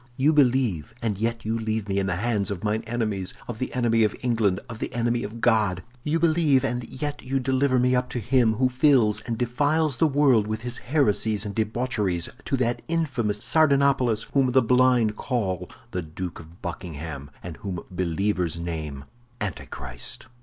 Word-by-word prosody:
You 145 Hz, +4 st, +4 dB
believe, 125 Hz, -, +2 dB
and 110 Hz, -3 st, 0 dB
yet 115 Hz, 0 st, -1 dB
you 115 Hz, +1 st, -1 dB
leave 110 Hz, -2 st, -2 dB
me 100 Hz, 0 st, 0 dB
in 95 Hz, -, 0 dB
the 90 Hz, -, 0 dB
hands 105 Hz, 0 st, 0 dB
of 100 Hz, -1 st, -4 dB
mine 110 Hz, +1 st, 0 dB
enemies, 110 Hz, -5 st, -2 dB
of 115 Hz, -2 st, -6 dB
the 130 Hz, -, -2 dB
enemy 115 Hz, -2 st, +3 dB
of 105 Hz, -, +1 dB
England, 110 Hz, -6 st, +1 dB
of 115 Hz, -1 st, -8 dB
the -, -, -3 dB
enemy 120 Hz, 0 st, +1 dB
of 115 Hz, +3 st, -7 dB
God! 105 Hz, -6 st, +2 dB, 0.2 s
You 155 Hz, +2 st, +1 dB
believe, 155 Hz, -5 st, +3 dB
and 125 Hz, -2 st, -1 dB
yet 145 Hz, +3 st, -4 dB
you 135 Hz, +1 st, -1 dB
deliver 130 Hz, 0 st, +2 dB
me 125 Hz, +1 st, +3 dB
up 125 Hz, 0 st, 0 dB
to 125 Hz, -, -3 dB
him 120 Hz, 0 st, +3 dB
who 130 Hz, +4 st, +2 dB
fills 125 Hz, -4 st, +3 dB
and 115 Hz, -2 st, -2 dB
defiles 145 Hz, +4 st, +1 dB
the 160 Hz, -, +4 dB
world 135 Hz, -7 st, +3 dB
with 110 Hz, +1 st, -3 dB
his 120 Hz, 0 st, -4 dB
heresies 110 Hz, -6 st, +1 dB
and 100 Hz, -, -4 dB
debaucheries—to 110 Hz, -, -1 dB
that 120 Hz, -1 st, 0 dB
infamous 130 Hz, -11 st, -1 dB
Sardanapalus 140 Hz, -7 st, +3 dB
whom 130 Hz, -3 st, +3 dB
the 130 Hz, -, +5 dB
blind 125 Hz, -3 st, +3 dB
call 95 Hz, -8 st, -2 dB, 0.2 s
the 90 Hz, -, -2 dB
Duke 85 Hz, +2 st, -6 dB
of 85 Hz, +2 st, -15 dB
Buckingham, 80 Hz, -5 st, -6 dB
and 85 Hz, -3 st, -7 dB
whom 95 Hz, -4 st, -5 dB
believers 90 Hz, -1 st, -1 dB
name 80 Hz, -5 st, -5 dB, 0.3 s
Antichrist!" 70 Hz, -10 st, -5 dB
115 Hz, 175 wpm, -25 LUFS, 100-130 Hz, 0.3 s, the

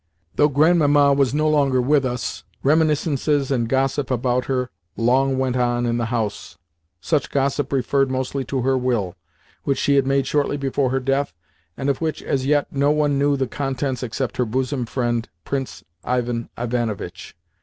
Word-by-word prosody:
Though 150 Hz, -, +5 dB
Grandmamma 145 Hz, -1 st, +4 dB
was 140 Hz, -2 st, +2 dB
no 155 Hz, +2 st, +1 dB
longer 140 Hz, -4 st, +3 dB
with 140 Hz, +2 st, +2 dB
us, 125 Hz, -1 st, -3 dB, 0.2 s
reminiscences 150 Hz, -1 st, +2 dB
and 120 Hz, -4 st, 0 dB
gossip 135 Hz, +1 st, 0 dB
about 125 Hz, 0 st, 0 dB
her 125 Hz, -1 st, -1 dB, 0.3 s
long 130 Hz, +3 st, +2 dB
went 130 Hz, -1 st, 0 dB
on 120 Hz, -1 st, +1 dB
in 120 Hz, 0 st, 0 dB
the 115 Hz, -, 0 dB
house. 110 Hz, -7 st, -3 dB, 0.4 s
Such 150 Hz, -, 0 dB
gossip 140 Hz, 0 st, 0 dB
referred 135 Hz, 0 st, +1 dB
mostly 130 Hz, +1 st, -2 dB
to 130 Hz, -3 st, -2 dB
her 135 Hz, +1 st, +2 dB
will, 120 Hz, -8 st, -1 dB, 0.5 s
which 140 Hz, -, 0 dB
she 140 Hz, 0 st, +2 dB
had 135 Hz, -1 st, +2 dB
made 135 Hz, 0 st, +2 dB
shortly 145 Hz, -1 st, 0 dB
before 135 Hz, -1 st, 0 dB
her 135 Hz, +1 st, 0 dB
death, 135 Hz, -, -1 dB, 0.4 s
and 135 Hz, -, -3 dB
of 140 Hz, +1 st, 0 dB
which, 160 Hz, -1 st, -2 dB
as 135 Hz, -1 st, -1 dB
yet, 145 Hz, 0 st, +3 dB
no 140 Hz, +1 st, +2 dB
one 145 Hz, -2 st, +2 dB
knew 145 Hz, 0 st, +2 dB
the 135 Hz, -, 0 dB
contents 135 Hz, -1 st, -3 dB
except 125 Hz, +1 st, -3 dB
her 125 Hz, -, +2 dB
bosom 130 Hz, +2 st, -2 dB
friend, 120 Hz, -2 st, -1 dB, 0.2 s
Prince 135 Hz, -2 st, -4 dB, 0.2 s
Ivan 120 Hz, -2 st, -1 dB
Ivanovitch. 120 Hz, -3 st, -3 dB
135 Hz, 170 wpm, -22 LUFS, 125-140 Hz, 0.5 s, Though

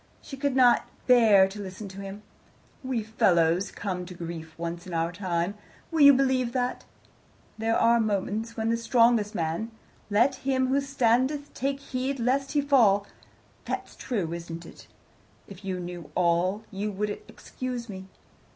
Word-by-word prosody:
She 275 Hz, -, -9 dB
could 275 Hz, -1 st, -1 dB
not 250 Hz, -2 st, +5 dB, 0.2 s
bear 220 Hz, -6 st, +6 dB
to 200 Hz, +2 st, -8 dB
listen 195 Hz, +1 st, -7 dB
to 190 Hz, +1 st, -9 dB
him. 195 Hz, +2 st, -8 dB, 0.6 s
"We 255 Hz, -4 st, -1 dB
fellows 190 Hz, -5 st, +2 dB
all -, -, -18 dB
come 185 Hz, -3 st, -3 dB
to 180 Hz, -, -9 dB
grief 165 Hz, -2 st, -7 dB
once 170 Hz, +1 st, -5 dB
in 175 Hz, -, -5 dB
our 165 Hz, +1 st, 0 dB
time. 175 Hz, 0 st, -2 dB, 0.4 s
Will 325 Hz, -2 st, +1 dB
you 285 Hz, 0 st, +10 dB
believe 260 Hz, -2 st, +1 dB
that? 250 Hz, -1 st, -2 dB, 0.7 s
There 225 Hz, +1 st, +1 dB
are 235 Hz, +1 st, +4 dB
moments 220 Hz, +2 st, -2 dB
when 220 Hz, 0 st, 0 dB
the 230 Hz, -, +1 dB
strongest 230 Hz, -2 st, +3 dB
man 165 Hz, +6 st, -2 dB, 0.4 s
'Let 235 Hz, +6 st, +3 dB
him 260 Hz, -1 st, 0 dB
who 275 Hz, +2 st, +2 dB
standeth, 275 Hz, +2 st, +1 dB
take 275 Hz, +1 st, -2 dB
heed 265 Hz, 0 st, -3 dB
lest 270 Hz, +4 st, 0 dB
he 295 Hz, -, +3 dB
fall.' 230 Hz, -8 st, +4 dB, 0.6 s
That's -, -, -5 dB
true, 195 Hz, -10 st, -3 dB
isn't 170 Hz, 0 st, -7 dB
it? -, -, -14 dB, 0.6 s
If 200 Hz, 0 st, -12 dB
you 190 Hz, -1 st, -3 dB
knew 175 Hz, -3 st, -7 dB
all, 180 Hz, +4 st, +1 dB
you 205 Hz, +2 st, -3 dB
would 205 Hz, +1 st, -2 dB, 0.2 s
excuse 250 Hz, -2 st, -6 dB
me. 190 Hz, -3 st, -8 dB
215 Hz, 160 wpm, -27 LUFS, 185-255 Hz, 0.7 s, you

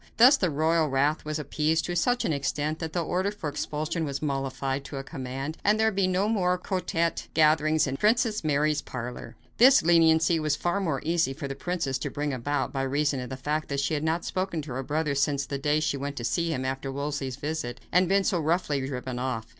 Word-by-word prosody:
Thus 250 Hz, +5 st, +8 dB
the 185 Hz, -10 st, 0 dB
royal 160 Hz, +2 st, +2 dB
wrath 140 Hz, +2 st, +1 dB
was 155 Hz, 0 st, -2 dB
appeased 155 Hz, +2 st, 0 dB
to 175 Hz, -, -3 dB
such 245 Hz, +8 st, +1 dB
an 160 Hz, -, +1 dB
extent 150 Hz, +2 st, -2 dB
that 160 Hz, -2 st, -4 dB
the 175 Hz, +1 st, -1 dB
order 185 Hz, +4 st, 0 dB
for 205 Hz, -7 st, -6 dB
expulsion 155 Hz, +3 st, -3 dB
was 140 Hz, -2 st, -3 dB
modified 135 Hz, -1 st, -2 dB
to 140 Hz, -, -7 dB
a 135 Hz, -, -4 dB
command 135 Hz, +4 st, -5 dB
that 210 Hz, +1 st, +3 dB
there 220 Hz, 0 st, +3 dB
be 195 Hz, -2 st, +1 dB
no 185 Hz, +2 st, +1 dB
more 180 Hz, -5 st, +1 dB
quartette 180 Hz, -2 st, -1 dB
gatherings 155 Hz, 0 st, +4 dB
in 135 Hz, -1 st, -3 dB
Princess 220 Hz, -, +2 dB
Mary's 150 Hz, 0 st, +1 dB
parlor. 125 Hz, -1 st, -7 dB, 0.2 s
This 260 Hz, +3 st, +7 dB
leniency 165 Hz, 0 st, +4 dB
was 155 Hz, -1 st, 0 dB
more 175 Hz, -6 st, 0 dB
easy 165 Hz, -4 st, +1 dB
for 140 Hz, 0 st, -6 dB
the 135 Hz, -, -4 dB
princess 140 Hz, -5 st, -2 dB
to -, -, -3 dB
bring 145 Hz, -1 st, -2 dB
about, 145 Hz, +4 st, -2 dB
by 135 Hz, -, -1 dB
reason 140 Hz, +1 st, 0 dB
of 125 Hz, -, -6 dB
the 130 Hz, -, -5 dB
fact 150 Hz, +3 st, -2 dB
that 140 Hz, -1 st, -1 dB
she 140 Hz, +3 st, 0 dB
had 150 Hz, 0 st, -1 dB
not 160 Hz, +2 st, 0 dB
spoken 185 Hz, -4 st, -2 dB
to 145 Hz, -, -8 dB
her 130 Hz, +2 st, -3 dB
brother 150 Hz, +2 st, -1 dB
since 140 Hz, 0 st, +1 dB
the 140 Hz, 0 st, -4 dB
day 150 Hz, +2 st, +2 dB
she 155 Hz, -2 st, -1 dB
went 140 Hz, +1 st, -4 dB
to 120 Hz, -, -5 dB
see 170 Hz, +7 st, 0 dB
him 130 Hz, -4 st, -2 dB
after 135 Hz, +1 st, -3 dB
Wolsey's 140 Hz, -2 st, -3 dB
visit, 145 Hz, -4 st, -4 dB
and 180 Hz, +2 st, +4 dB
had -, -, -5 dB
been 195 Hz, 0 st, +3 dB
so 180 Hz, -2 st, +1 dB
roughly 155 Hz, -3 st, 0 dB
driven 125 Hz, -2 st, -4 dB
off. 125 Hz, -3 st, -2 dB
150 Hz, 225 wpm, -27 LUFS, 140-170 Hz, 0.2 s, Thus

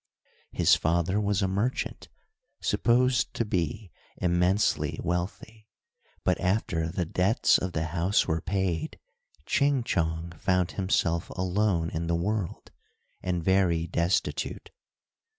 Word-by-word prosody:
His -, -, +4 dB
father 85 Hz, +5 st, +1 dB
was 100 Hz, -1 st, +1 dB
a -, -, +2 dB
merchant, 100 Hz, +7 st, -2 dB, 0.5 s
supposed 125 Hz, 0 st, +2 dB
to 115 Hz, -, 0 dB
be 95 Hz, 0 st, -2 dB, 0.3 s
immensely 90 Hz, +3 st, +1 dB
wealthy, 100 Hz, +5 st, -4 dB, 0.6 s
but -, -, +1 dB
after 90 Hz, -4 st, 0 dB
the 90 Hz, +1 st, -2 dB
debts 90 Hz, +7 st, +3 dB
of 90 Hz, -1 st, -4 dB
the 80 Hz, -, -1 dB
house 90 Hz, +4 st, +2 dB
were 80 Hz, 0 st, 0 dB
paid 95 Hz, -, -2 dB, 0.5 s
Ching 140 Hz, -3 st, +2 dB
Chong 80 Hz, -6 st, -1 dB
found 90 Hz, -1 st, +1 dB
himself 90 Hz, -3 st, 0 dB
alone 90 Hz, -2 st, 0 dB
in 80 Hz, +1 st, -3 dB
the 85 Hz, -, +1 dB
world, 95 Hz, +2 st, -3 dB, 0.5 s
and 90 Hz, -2 st, -2 dB
very 90 Hz, -3 st, +2 dB
destitute. 85 Hz, +2 st, -1 dB
90 Hz, 115 wpm, -27 LUFS, 85-105 Hz, 0.6 s, His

